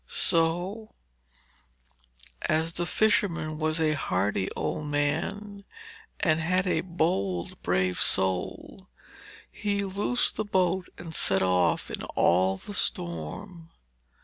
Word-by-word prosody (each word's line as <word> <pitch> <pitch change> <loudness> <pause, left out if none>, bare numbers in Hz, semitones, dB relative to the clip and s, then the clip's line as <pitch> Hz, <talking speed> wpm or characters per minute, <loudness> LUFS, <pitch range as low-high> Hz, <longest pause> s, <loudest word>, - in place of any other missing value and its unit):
So, 175 +7 +1 1.5
as 160 +1 +1
the 175 0 -2
fisherman 175 -9 +1
was 155 0 +1
a 155 -1 +2
hardy 95 -7 -1
old 150 -1 -3
man 165 +8 -2 0.6
and 155 -3 +2
had 180 +3 +1
a 180 -3 +1
bold, 130 - -2
brave 90 0 0
soul, 95 -1 0 0.6
he 200 -1 -1
loosed 200 +5 0
the 215 - 0
boat 185 -2 0
and 165 -2 -8
set 95 -10 +3
off 90 -1 +1
in - - -3
all 95 +3 +3
the 205 - -9
storm. 85 - -2
160 Hz, 110 wpm, -27 LUFS, -, 1.5 s, set